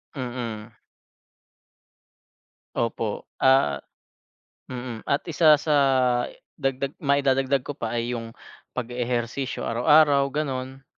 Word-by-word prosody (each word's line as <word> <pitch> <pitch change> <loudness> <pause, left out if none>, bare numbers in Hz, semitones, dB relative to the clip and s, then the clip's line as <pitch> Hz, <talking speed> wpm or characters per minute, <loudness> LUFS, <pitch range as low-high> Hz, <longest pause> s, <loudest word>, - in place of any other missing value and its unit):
Mm. 120 -4 -6 2.0
Opo, 115 -2 -2 0.2
ah 130 - +4 0.9
mm. 125 -3 -7
At 140 - +1
isa 155 -1 +5
sa 150 +1 0 0.9
dagdag 135 +1 -1
maidadagdag 135 -2 +2
ko - - -4
pa 115 -3 -3
ay 120 +1 -1
'yung 115 -1 -6 0.4
pag-e-ehersisyo 125 +1 -2
araw-araw 140 +3 +4
ganun. 135 -2 -4
130 Hz, 90 wpm, -25 LUFS, 120-140 Hz, 2.0 s, isa